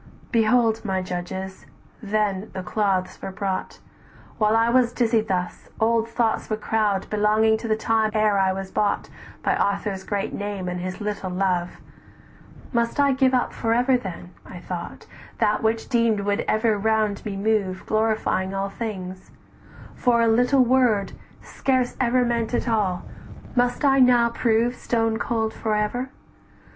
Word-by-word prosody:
Behold, 225 -1 +3
my 190 -3 -1
judges, 190 +1 -6 0.3
then 210 -1 -1
the 185 - -5
cloths 190 -1 -1
were - - -5
brought; 190 -1 -3 0.6
While 215 0 +3
I 230 0 +3
was 245 0 +3
dizzied 225 -3 +1
thus, 180 -2 -3
old 230 0 +2
thoughts 230 -1 0
would 215 -1 -2
crowd 210 -3 0
"Belonging 215 +1 +3
to 230 - -5
the 215 - +2
time 220 0 +1
ere 215 -2 +3
I 190 -1 +3
was 190 0 -5
bought 205 -1 -1 0.3
By - - +2
Arthur's 200 -1 -1
great 200 -1 -3
name 200 -2 -4
and 180 0 -3
his 185 +3 -5
little 205 -2 -3
love; 180 -1 -1 1.0
Must 235 +3 0
I 280 -1 +4
give 260 -1 +3
up 250 - 0
for 225 -1 0
ever 250 +2 +3
then, 185 -6 -5
I - - -10
thought, 175 0 -7 0.3
"That 210 - +1
which 225 0 0
I - - -21
deemed 230 -4 +2
would 205 +2 -1
ever 215 -1 +1
round 215 -1 0
me 200 -2 -4
move, 200 -3 0
Glorifying 215 -3 0
all 195 0 -1
things; 190 -4 -6 0.6
for 235 -1 +2
a - - +3
little 245 +3 +4
word, 240 -6 +2 0.3
Scarce 255 -2 -1
ever 250 0 +2
meant 235 0 -1
at - - -1
all, 205 -6 0 0.5
must 245 +3 +1
I 270 -1 +4
now 245 -2 +5
prove 235 +1 +1
"Stone 225 -2 -1
cold 225 -2 -1
for 215 -2 -2
ever? 245 +5 -1
215 Hz, 160 wpm, -23 LUFS, 195-235 Hz, 1.0 s, now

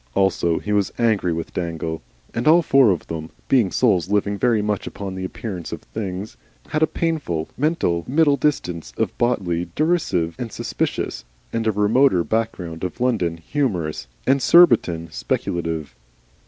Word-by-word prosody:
Also 90 -4 +2
he 105 - -4
was 100 -2 +1
angry 110 -7 +2
with 80 0 -4
Dangle. 80 -2 -3 0.3
And 115 - -2
all 165 +2 +6
four 135 -5 +5
of 90 -5 0
them, 80 -1 -6 0.2
being 120 -8 +3
souls 95 -8 +2
living 100 0 +1
very 110 0 +2
much 105 -2 -2
upon 100 -2 -6
the 95 0 -5
appearances 95 -2 -5
of - - -7
things, 100 -1 -5 0.3
had 155 - -1
a 160 - +5
painful, 145 - -2
mental 130 - 0
middle 145 +1 +4
distance 90 - -1
of - - -1
Botley 90 -8 0
derisive 150 - +1
and 120 -3 -4
suspicious, - - -3 0.3
and 115 -1 -1
a - - +4
remoter 105 -1 +3
background 95 -7 -3
of 90 - -4
London 105 -10 0
humorous, 85 - -2 0.2
and 135 +1 +3
Surbiton 115 - +5
speculative. 80 -5 -2
100 Hz, 155 wpm, -22 LUFS, 85-125 Hz, 0.3 s, all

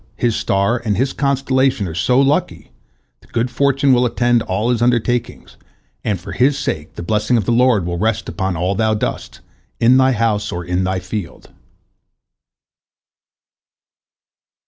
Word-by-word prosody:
His 120 -2 0
star 100 +5 0
and 105 -3 -1
his 130 +2 0
constellation 135 -5 0
are 80 - -6
so 125 +9 +2
lucky 145 +6 0 0.5
that - - -25
good 120 +1 -1
fortune 140 +1 +2
will 125 0 +3
attend 120 0 +1
all 105 +6 -1
his 120 -2 -1
undertakings, 120 0 -1 0.5
and 100 -4 -1
for 95 +3 -9
his 135 +3 +2
sake 80 - -4
the - - -6
blessing 105 +5 +1
of 105 - -1
the - - 0
Lord 120 -5 +3
will 85 0 -3
rest 110 0 -1
upon 95 -3 -3
all 90 +3 0
thou 110 +1 +1
doest, 105 - -4 0.4
in 120 +3 +5
thy 130 0 +4
house 110 -2 0
or 90 0 -5
in 90 +1 -1
thy 95 0 -1
field." 90 0 -7
115 Hz, 155 wpm, -18 LUFS, 100-125 Hz, 0.5 s, in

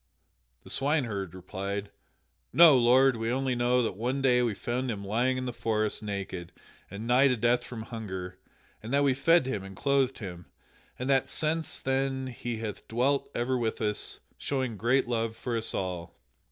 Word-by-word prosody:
The - - -8
swineherd 120 - -1
replied: 100 +2 -5 0.6
"No, 160 +1 +8
lord, 130 +1 +5
we 115 0 -2
only 130 +1 0
know 125 +1 +2
that 110 - -2
one 125 +6 -1
day 125 -2 +4
we 115 -4 0
found 125 +5 -2
him 100 -3 -4
lying 120 +6 +1
in 130 - -3
the 125 - -3
forest 110 -2 -1
naked 100 -4 -5 0.4
and 100 +3 -7
nigh 125 +3 +5
to 125 -2 +2
death 120 +2 +2
from 115 -3 -7
hunger 95 -6 -6 0.4
and 110 - -7
that 140 +1 +3
we 140 -2 +4
fed 165 +3 +4
him 105 -7 -3
and 95 0 -9
clothed 135 -2 +1
him, 90 -5 -8 0.5
and 125 - -4
that 135 -2 +2
since 160 0 0
then 135 0 -1
he 120 -2 -5
hath 110 -2 -6
dwelt 130 +5 +1
ever 125 +2 0
with 115 -2 -1
us, 105 -2 -2 0.2
showing 130 -5 -2
great 120 +6 +2
love 115 -2 -1
for 120 +1 -3
us 115 -1 -1
all." 90 -3 -4
120 Hz, 180 wpm, -29 LUFS, 105-130 Hz, 0.6 s, No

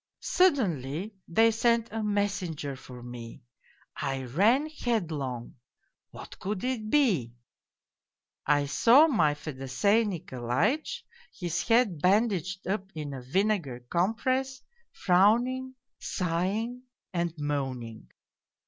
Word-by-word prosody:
" - - -62
Suddenly 195 - +1
they 225 +6 +4
sent 230 0 +1
a 225 0 -3
messenger 200 -9 -2
for 125 -1 -11
me. 120 -2 -9 0.5
I 135 -2 -3
ran 210 - +3
headlong 160 - -3 0.5
what - - -11
could 195 0 -3
it 245 -4 -2
be? 190 - +2 1.1
I 145 0 +3
saw 240 - +6
my 170 - +2
Fedosey 150 - 0
Nikolaitch, 180 - -2 0.3
his 175 -2 -3
head 225 - +3
ban 205 +7 +4
daged 190 0 -4
up 195 0 -2
in 150 -2 -5
a 130 - -6
vinegar 155 - 0
compress, 255 +8 0 0.3
frowning, 240 +8 +2 0.2
sighing, 195 +8 -2 0.3
and 170 -1 0
moaning. 135 -6 -4
185 Hz, 105 wpm, -28 LUFS, 145-230 Hz, 1.1 s, saw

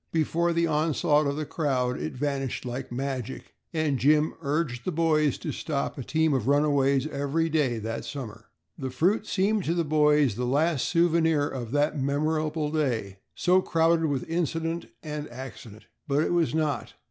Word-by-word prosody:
Before 170 +2 +1
the 170 0 +2
onslaught 150 -1 +2
of 140 - -1
the 155 +1 -3
crowd 130 -6 -1
it 75 +1 -4
vanished 135 -1 -2
like 125 +1 -5
magic 130 -1 -4 0.2
and 155 -5 0
Jim 150 +5 +3
urged 140 -4 -1
the 185 - -2
boys 155 -3 +2
to - - -4
stop 140 -3 -3
a 135 - -5
team 160 +3 +1
of 130 -3 -1
runaways 140 -2 +3
every 155 +2 -1
day 145 -7 +1
that 115 +1 -4
summer. 115 -6 -7 0.3
The 130 -2 -3
fruit 185 - +1
seemed 205 +1 +1
to 165 - 0
the 170 -1 0
boys 150 -4 +3
the 125 +4 -3
last 145 +1 +1
souvenir 165 -3 +3
of 125 -6 -5
that 145 +1 +1
memorable 155 +2 0
day, 115 -11 -1 0.2
so 180 +1 +3
crowded 165 -1 +2
with 140 -5 -1
incident 165 0 -2 0.2
and 150 -1 -5
accident. 115 -4 -10 0.2
But 145 +1 +2
it - - 0
was 165 -3 +1
not. 150 -6 -1
150 Hz, 170 wpm, -27 LUFS, 135-160 Hz, 0.3 s, Jim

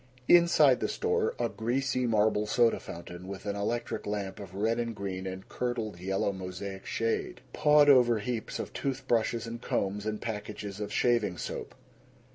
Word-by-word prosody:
Inside 165 -6 +6
the - - 0
store, 450 +1 0
a - - +1
greasy 125 +2 -1
marble 105 -1 +2
soda 115 +1 +3
fountain 85 +2 -9
with 95 0 -7
an 100 -1 -2
electric 115 +4 -2
lamp 100 -2 -3
of 95 -2 -9
red 110 +4 +1
and 115 -1 -2
green 95 -2 -4
and 95 0 -7
curdled 115 -6 -3
yellow 95 +2 0
mosaic 95 +1 -6
shade. 115 +1 -1
Pawed 150 -1 +5
over 125 -4 +6
heaps 110 +2 -3
of - - -5
tooth 135 -1 -3
brushes 115 -1 +1
and 115 +1 -6
combs 100 0 -1
and 105 -1 -2
packages 105 -2 -5
of 105 - -4
shaving 115 -7 +2
soap. - - -5
110 Hz, 165 wpm, -30 LUFS, 100-120 Hz, -, Inside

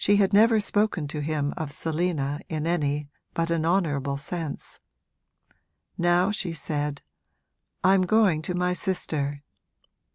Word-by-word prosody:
She 205 - +5
had 200 0 +3
never 220 +2 +6
spoken 205 -6 +1
to 150 0 -3
him 145 -1 -1
of 155 -3 -4
Selina 155 -2 -1
in 155 -1 -2
any 150 -4 -1 0.2
but 165 0 0
an 165 -1 +1
honourable 145 -7 +1
sense. 155 +1 -6 1.2
Now 175 +3 +3
she 190 -5 -2
said, 145 -2 -3 0.8
'I'm 185 0 +4
going 200 -7 +4
to 180 +3 -3
my 180 0 +1
sister.' 150 -6 -2
165 Hz, 130 wpm, -26 LUFS, 145-185 Hz, 1.2 s, never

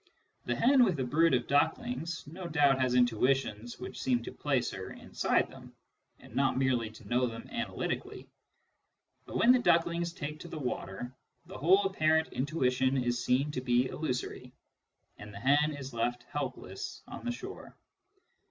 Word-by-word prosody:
The - - 0
hen 260 +2 +5
with 185 - +1
a - - +1
brood 150 +4 +3
of 120 -1 0
ducklings 165 - 0
no 170 +5 -7
doubt 145 -5 +3
has 125 -1 +2
intuitions 120 -1 +1
which - - -7
seem 125 -2 +1
to - - -6
place 130 -5 0
her 95 -1 -6
inside - - 0
them, - - -13 0.4
and - - -15
not 135 0 +2
merely 125 -4 +1
to 110 -1 -14
know 125 +3 +2
them 115 -1 -7
analytically; 235 0 -4 1.0
but - - -4
when 235 - +6
the 255 - +5
ducklings 170 -5 +2
take 155 -3 -6
to - - -9
the 165 - -7
water, 125 -3 -4 0.3
the - - -9
whole 190 +7 +5
apparent 160 -4 +2
intuition 130 -2 +1
is 120 -1 0
seen 135 +4 +2
to 130 - -3
be 125 0 +2
illusory, 125 -3 -4 0.7
and 105 - -9
the 100 - -9
hen 145 +5 +3
is 135 -2 -7
left 120 +1 -1
helpless 130 -9 -5
on - - -8
the 245 - -1
shore. 380 +11 -8
135 Hz, 165 wpm, -31 LUFS, 125-165 Hz, 1.0 s, when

